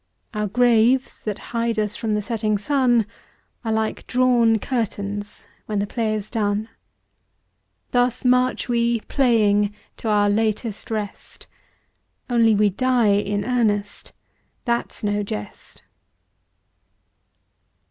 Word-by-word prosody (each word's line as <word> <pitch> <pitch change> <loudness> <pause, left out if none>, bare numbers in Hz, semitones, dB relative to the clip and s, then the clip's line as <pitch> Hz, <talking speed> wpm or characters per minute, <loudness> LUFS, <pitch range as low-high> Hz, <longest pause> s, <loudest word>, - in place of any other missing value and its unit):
Our 210 -1 -1
graves 245 +3 +2
that 210 -2 -2 0.2
hide 230 -1 0
us 210 -1 -1
from 220 -2 -1
the 210 - -1
setting 215 -2 -1
sun 245 0 +2 0.6
Are 225 - -2
like 220 0 -2
drawn 245 -3 +3
curtains 205 -3 -4 0.2
when 210 - -2
the 200 - +1
play 215 0 -1
is 215 0 -6
done. 210 -1 -1 1.2
Thus 245 +1 +1
march 250 0 +2
we, 235 -1 +1
playing, 210 -6 +2 0.2
to - - -6
our 205 -1 +3
latest 215 +1 -1
rest, 215 -3 -5 0.9
Only 230 -2 +4
we 205 0 +3
die 245 -1 +2
in 205 0 0
earnest, 210 -5 -1 0.5
that's 235 -1 -2
no 205 0 0
jest. 105 - -8
220 Hz, 115 wpm, -22 LUFS, 205-240 Hz, 1.2 s, Only